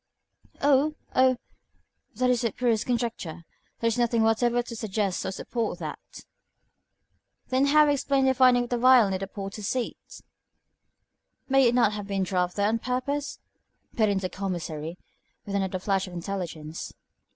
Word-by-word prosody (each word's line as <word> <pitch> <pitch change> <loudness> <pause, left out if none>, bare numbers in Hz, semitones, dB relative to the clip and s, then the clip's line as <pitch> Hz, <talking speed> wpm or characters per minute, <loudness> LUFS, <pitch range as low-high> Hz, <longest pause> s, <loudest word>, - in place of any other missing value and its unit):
"Oh! 290 +2 +3 0.2
oh! 255 -1 +4 0.8
That 250 +2 +2
is 245 -1 +1
the 230 -3 0
purest 230 -2 0
conjecture. 230 -9 -2 0.4
There 230 - +1
is 230 +1 0
nothing 235 -1 +2
whatever 240 +2 +2
to 235 - -8
suggest 210 -3 -2
or - - -2
support 230 +4 -3
that." - - -8 1.2
"Then 260 +2 +2
how 300 +1 +6
explain 275 -1 +2
the 265 - +4
finding 250 -1 +5
of 240 - -9
the 245 - 0
vial 250 -5 +6
near 190 - -1
the 195 - -4
porter's 195 +1 -6
seat?" 250 -2 -2 1.5
"May 270 -1 +5
it 240 - +2
not 235 -4 +3
have 205 -1 -5
been 195 -1 -1
dropped 180 -1 -1
there 205 0 +2
on 225 +2 +1
purpose?" 275 +4 -2 0.6
put 220 -3 +3
in 200 - +1
the 190 -1 -2
Commissary, 170 -4 -4 0.5
with 200 - -6
another 190 -1 -1
flash 195 0 -1
of 180 - -10
intelligence. 170 -4 -5
225 Hz, 160 wpm, -26 LUFS, 195-255 Hz, 1.5 s, how